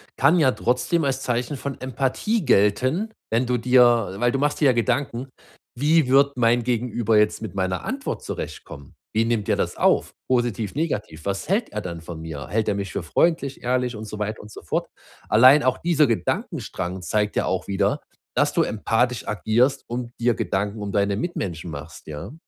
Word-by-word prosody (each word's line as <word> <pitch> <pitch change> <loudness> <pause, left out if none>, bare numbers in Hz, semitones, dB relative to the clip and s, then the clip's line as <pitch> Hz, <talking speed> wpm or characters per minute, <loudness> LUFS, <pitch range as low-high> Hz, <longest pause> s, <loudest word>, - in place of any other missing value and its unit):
kann 145 +7 +4
ja 140 -5 +4
trotzdem 125 +8 0
als 135 -1 -1
Zeichen 125 +3 -2
von 140 0 -5
Empathie 135 - -1
gelten. 130 - +2 0.2
Wenn 115 +3 +1
du 125 0 +1
dir 120 -4 +4
weil 120 +1 +2
du 135 - -1
machst 145 +2 0
dir 135 -4 +5
Gedanken: 125 +1 -1 0.5
„Wie 150 +3 +3
wird 140 +1 +4
mein 120 0 +3
Gegenüber 120 -2 +1
jetzt 105 0 +2
mit 110 -4 -6
meiner 95 -1 -1
Antwort 270 +1 -4
zurechtkommen? 70 -1 -7 0.2
Wie 110 +1 +1
nimmt 115 -3 -1
er - - +2
das - - -1
auf? - - +2 0.2
Positiv, 120 -5 0
negativ? 105 - -3
Was 100 - -3
hält 220 +4 +1
er 105 - -2
dann 85 -4 -6
von 80 -1 -8
mir? 75 -5 -7
Hält 110 0 0
er 100 - +1
mich 100 -1 -4
für - - -3
freundlich, 140 - 0
ehrlich“ 125 -2 0
und 110 - -7
so 105 0 -7
weiter 105 +1 -3
und 105 - -12
so - - -11
fort. 85 - -2 0.4
Allein 130 +7 +7
auch 130 0 +1
dieser 160 -4 +3
Gedankenstrang 90 -3 -2
zeigt 105 +4 -1
ja - - +1
auch 95 0 -2
wieder, 100 -1 0 0.3
dass - - +2
du - - +3
empathisch 115 +3 0
agierst 115 +6 +1
und 120 0 -4
dir 120 -2 +3
Gedanken 100 +2 -2
um 100 -1 -4
deine 100 -1 +1
Mitmenschen 90 - -4
machst, 75 +1 -9
ja? 80 - -7
120 Hz, 185 wpm, -23 LUFS, 100-130 Hz, 0.5 s, Allein